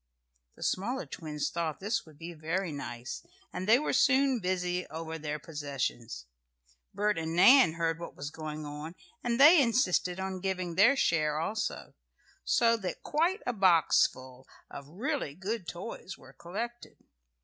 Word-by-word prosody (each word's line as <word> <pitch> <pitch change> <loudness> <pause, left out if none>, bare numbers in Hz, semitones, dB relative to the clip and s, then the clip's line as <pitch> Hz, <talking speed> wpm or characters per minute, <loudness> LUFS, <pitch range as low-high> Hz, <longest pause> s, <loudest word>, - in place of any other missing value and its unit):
The - - -9
smaller 245 +8 -1
twins 150 -3 -4
thought 165 -3 -3
this 220 0 -2
would 155 -2 -16
be 170 +2 -8
very 165 +3 -2
nice, 120 -3 -6 0.3
and 185 - -4
they 225 +3 +7
were 300 - -1
soon 270 -2 +3
busy 180 -1 -1
over 160 0 -6
their 150 0 -3
possessions. 140 - -4 0.7
Bert 210 -3 0
and 160 0 -3
Nan 200 - +7
heard 165 -1 -1
what 170 - -8
was 145 +1 -6
going 155 -1 -6
on, 150 +3 -7 0.3
and 235 0 -1
they 305 +3 +9
insisted 190 -7 +1
on 190 0 -3
giving 185 -2 -2
their 215 +10 +5
share 155 - +1
also, 210 +7 -3 0.5
so 230 - +3
that 190 -5 -5
quite 345 +7 0
a 245 - -1
box 185 -6 +4
full 130 0 -14 0.2
of 140 -1 -9
really 210 - -3
good 190 +1 -4
toys 185 +1 -7
were 130 - -16
collected. 235 +10 -7
175 Hz, 155 wpm, -30 LUFS, 155-225 Hz, 0.7 s, they